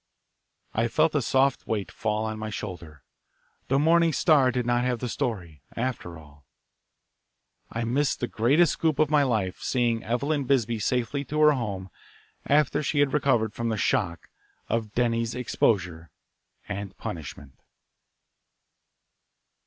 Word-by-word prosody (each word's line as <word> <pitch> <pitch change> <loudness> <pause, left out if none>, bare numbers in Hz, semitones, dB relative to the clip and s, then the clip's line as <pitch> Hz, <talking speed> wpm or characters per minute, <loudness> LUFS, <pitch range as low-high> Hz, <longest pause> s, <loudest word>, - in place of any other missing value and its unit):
I 115 +2 +1
felt 155 +6 +2
a 145 - +2
soft 135 +2 +1
weight 105 -3 -2
fall 110 0 -2
on 110 0 -4
my 110 0 -4
shoulder. 85 -8 -7 0.6
The 135 - +2
Morning 165 +2 +4
Star 145 -4 +4
did 125 0 -2
not 120 0 +1
have 125 -1 0
the 125 - -4
story, 95 - -4
after 115 -9 -3
all. 75 -2 -17 1.3
I 115 - -3
missed 135 +5 0
the - - 0
greatest 145 +11 +3
"scoop" 160 -3 0
of 155 0 +2
my 150 -1 +5
life 110 -9 -1
seeing 120 -3 0
Eveline 140 +5 -1
Bisbee 120 -4 +1
safely 125 +5 -1
to 150 +4 -3
her 150 0 +7
home 100 - -3 0.6
after 150 0 +3
she 150 0 -2
had 145 -1 +3
recovered 125 -7 +2
from 115 -1 -2
the 110 - -1
shock 105 -7 -1 0.4
of 110 -2 -1
Denny's 115 -1 0
exposure 90 -9 0 0.6
and 100 -1 -6
punishment. 70 -4 -8
120 Hz, 140 wpm, -26 LUFS, 105-140 Hz, 1.3 s, her